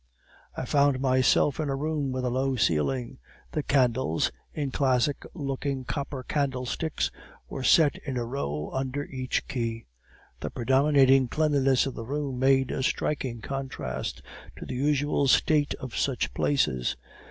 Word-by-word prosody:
"I - - -2
found 140 -2 +3
myself 130 +2 +3
in 155 -2 -1
a 135 - 0
room 145 -1 -1
with 130 0 -2
a 125 - 0
low 130 +1 0
ceiling; 70 - 0 0.3
the 155 - -1
candles, 130 - +1 0.2
in 145 -3 -3
classic 135 +1 +1
looking 140 -3 -3
copper 140 -1 -4
candle 135 -2 -1
sticks, 160 +5 -2 0.4
were 135 - -6
set 150 +3 +5
in 135 -3 -5
a 120 - -1
row 75 - -3
under 135 +2 -2
each 130 -2 -3
key. 115 -3 -3 0.5
The - - -4
predominating 135 +1 +4
cleanliness 140 -2 +2
of 135 - -3
the - - -6
room 140 -2 -3
made 135 0 +3
a - - -2
striking 130 -3 -1
contrast 130 - -4 0.3
to - - -7
the - - -5
usual 145 +1 +1
state 145 +2 +3
of 130 -3 -8
such 135 -3 -1
places. 65 - +1
135 Hz, 150 wpm, -27 LUFS, 125-140 Hz, 0.5 s, set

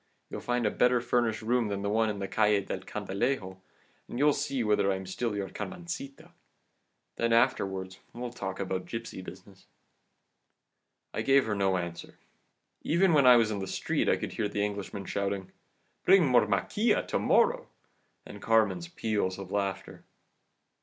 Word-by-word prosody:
You'll - - -5
find 120 -1 -1
a 105 - +2
better 125 0 +3
furnished 120 -2 0
room 120 0 +1
than 100 -1 -3
the 100 - -1
one 110 +1 +2
in 105 - -3
the 100 -1 -4
Calle 105 +1 +2
del - - -4
Candilejo, 95 -2 -3 0.5
and - - -7
you'll 145 +2 +4
see 135 -3 -2
whether 105 -2 +2
I - - 0
am 95 0 -6
still 105 +4 -3
your 100 -1 -3
Carmencita. 170 - -7 0.9
Then 115 0 0
afterwards 95 -6 +1
we'll 120 0 -6
talk 95 -5 -5
about 95 -1 -3
gipsy 115 -4 -6
business.' - - -13 1.5
"I - - -2
gave 135 0 +4
her 110 - -1
no 95 -2 +1
answer 85 -1 -6 0.6
even 170 +2 +3
when 140 -4 +5
I 125 - +9
was 115 -2 +3
in 105 - -2
the 95 - -4
street - - -1
I - - +3
could - - -5
hear 105 - -1
the 105 0 0
Englishman 100 -1 -5
shouting, 100 -1 -3 0.5
'Bring 190 -2 +6
more 125 -5 +4
maquila 155 - +1
to - - 0
morrow,' 485 +1 +2 0.6
and - - -10
Carmen's 115 +10 +2
peals 110 - -2
of 95 -1 -8
laughter. 100 -1 -3
110 Hz, 165 wpm, -29 LUFS, 100-125 Hz, 1.5 s, I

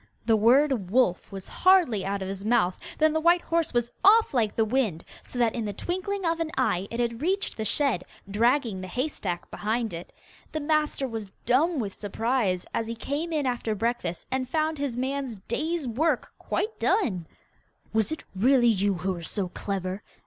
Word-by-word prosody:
The 225 -1 +4
word 240 -2 +3
'wolf' 215 -5 +2
was 195 -1 -7
hardly 355 - +4
out 195 0 -2
of - - -4
his 195 0 -5
mouth 215 -5 +2 0.2
than 310 0 +4
the 315 - +2
white 340 +2 +4
horse 335 -1 0
was 240 -1 0
off 435 0 +6
like 220 -5 +1
the 225 - +3
wind, 220 -8 0 0.2
so - - -7
that 235 -2 +2
in 235 - -2
the 205 -1 -3
twinkling 375 - -3
of 330 0 +1
an 330 -1 -1
eye 185 +2 +1
it 230 - -5
had 235 0 -1
reached 385 +5 0
the 220 - -3
shed, 255 -4 +1 0.2
dragging 225 0 +1
the 185 - -6
hay 250 +10 -1
stack 180 - -5
behind 220 -1 -1
it. 170 +1 -7 0.4
The 310 - -1
master 300 -2 0
was 225 -4 -5 0.2
dumb 300 +7 +3
with 205 -6 -2
surprise 210 -3 -1
as 225 - -1
he 230 - -4
came 290 +8 -3
in 300 -3 0
after 240 -3 -1
breakfast 225 -6 -2
and 260 -1 -1
found 310 -1 0
his 275 -4 -2
man's 265 -1 -2
day's 310 +4 -1
work 275 +4 0
quite 440 +1 -2
done. 185 - +1 0.7
'Was 220 +3 +1
it 315 - -4
really 245 +5 +4
you 200 -3 +3
who 185 +2 -1
were 175 - -7
so 185 +2 -3
clever? 190 +1 -4
240 Hz, 190 wpm, -27 LUFS, 205-300 Hz, 0.7 s, off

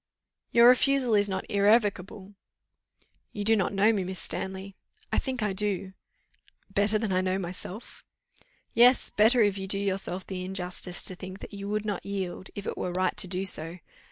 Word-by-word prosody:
"Your 235 0 +6
refusal 255 -1 +4
is 205 -1 +3
not 190 -1 -3
irrevocable." 205 -1 +1 1.0
"You 205 - -4
do 225 +2 +4
not 195 -4 0
know 205 +3 +3
me, 200 -3 -1
Miss 185 0 -5
Stanley." 190 +1 -5 0.4
"I - - +2
think 260 -4 -3
I 210 -2 0
do." 195 -1 0 0.8
"Better 205 +2 +3
than 215 -2 -2
I 185 - +2
know 185 0 0
myself." 185 +3 -8 0.7
"Yes, 245 +2 +5
better, 225 +3 +4
if 200 -1 +1
you 190 - -5
do 195 - -1
yourself 190 -2 -2
the 185 -1 -5
injustice 180 -1 -2
to - - -2
think 185 +1 -9
that - - -10
you 200 0 -6
would 210 0 -2
not 205 -3 -3
yield, 190 -2 -5
if 205 - -6
it - - -4
were 180 - -2
right 185 +1 0
to 210 -3 +2
do 185 +1 -2
so. 165 -2 0
195 Hz, 185 wpm, -27 LUFS, 185-210 Hz, 1.0 s, Your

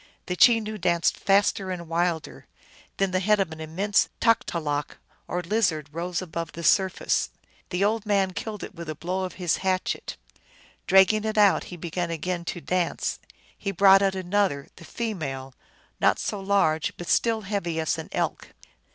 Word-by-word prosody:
The 180 - -3
Chenoo 215 0 +4
danced 170 -2 +2
faster 195 -1 +2
and 175 -2 -5
wilder; 165 -1 -2 0.5
then 195 -1 +1
the 185 - +1
head 210 +2 +3
of 190 -4 0
an 160 0 -8
immense 190 +6 +1
Taktalok, 155 -10 0 0.3
or 180 0 -2
lizard, 170 -7 0
rose 175 +3 -3
above 165 -1 -5
the 170 - -7
surface. 190 +1 +2 0.4
The 180 +1 0
old 215 +1 +1
man 195 -2 +2
killed 210 +1 -5
it - - -8
with 170 -1 -8
a 155 - -3
blow 185 +4 -2
of 185 - -7
his 175 -3 0
hatchet. 185 -1 -2 0.7
Dragging 195 +3 +5
it 220 0 -2
out 205 -2 +4
he 180 - -9
began 170 +1 -3
again 170 +2 -3
to 175 - -4
dance. 180 0 -1 0.4
He 200 - -4
brought 195 +1 +6
out 195 -1 +1
another, 185 -6 0
the 170 - -13
female, 140 - -4 0.5
not - - +3
so 205 - -3
large, 190 -6 +1
but 175 - -7
still 225 -2 +2
heavy 190 -5 -2
as 160 - 0
an - - -7
elk. - - -3
185 Hz, 170 wpm, -25 LUFS, 170-200 Hz, 0.7 s, brought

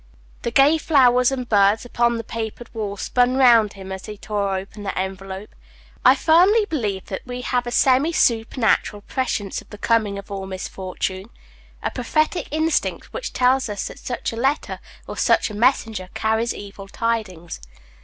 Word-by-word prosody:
The - - -2
gay 275 +6 +4
flowers 250 -5 +4
and 255 -2 -3
birds 205 +1 +3
upon 235 -1 +1
the 230 - -4
papered 230 +1 -6
walls 205 -3 -4
spun 250 +1 +2
round 235 -5 +5
him 190 -1 -9
as 190 0 -7
he 210 -1 -7
tore 200 -2 -2
open 200 +2 -8
the 200 -1 -4
envelope. 190 +1 -5 0.5
I - - +7
firmly 370 +7 +4
believe 210 - -3
that 190 - -5
we 250 0 -6
have 245 -1 -1
a - - -3
semi 265 +6 +3
supernatural 225 -5 +1
prescience 215 -7 -2
of - - -21
the 210 - -10
coming 215 -2 +1
of 200 0 -10
all 195 -1 -5
misfortune; 190 +1 -5 0.5
a - - -1
prophetic 310 +4 0
instinct, 315 +1 -1
which 485 0 -4
tells 255 -1 +2
us 205 -1 -4
that - - -11
such 245 -2 -4
a - - -7
letter, 270 +5 -1 0.3
or - - -8
such - - +2
a - - -8
messenger, 220 -4 +1
carries 220 +2 0
evil 200 -1 -9
tidings. 200 -6 -3
225 Hz, 170 wpm, -22 LUFS, 200-255 Hz, 0.5 s, I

